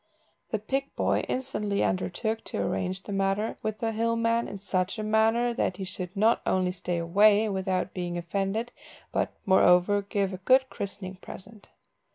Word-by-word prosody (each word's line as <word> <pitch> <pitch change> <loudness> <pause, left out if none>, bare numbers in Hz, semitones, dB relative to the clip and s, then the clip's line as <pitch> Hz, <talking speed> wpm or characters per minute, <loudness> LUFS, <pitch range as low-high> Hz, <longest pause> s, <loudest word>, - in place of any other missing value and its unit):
The 220 - 0
pig 270 +6 -3
boy - - +1
instantly 210 -6 -1
undertook 220 +5 -1
to - - -4
arrange 185 +1 -2
the 205 - -6
matter 195 +2 0
with 215 -1 -3
the 225 0 -1
hill 230 +1 0
man 230 0 +1
in 200 - -6
such 185 -1 -1
a 215 - -3
manner 225 +3 +2
that 185 -5 -1
he 195 - -4
should 185 0 -6
not 220 +3 +3
only 185 -1 +1
stay 180 -1 -3
away 205 +6 +4
without 190 -1 -1
being 175 -1 -3
offended, 195 +6 -2 0.4
but, - - 0
moreover, 190 +1 +5
give 200 -1 -1
a - - -4
good 260 +7 +3
christening 190 -1 -6
present. 200 +3 -12
200 Hz, 170 wpm, -27 LUFS, 185-220 Hz, 0.4 s, moreover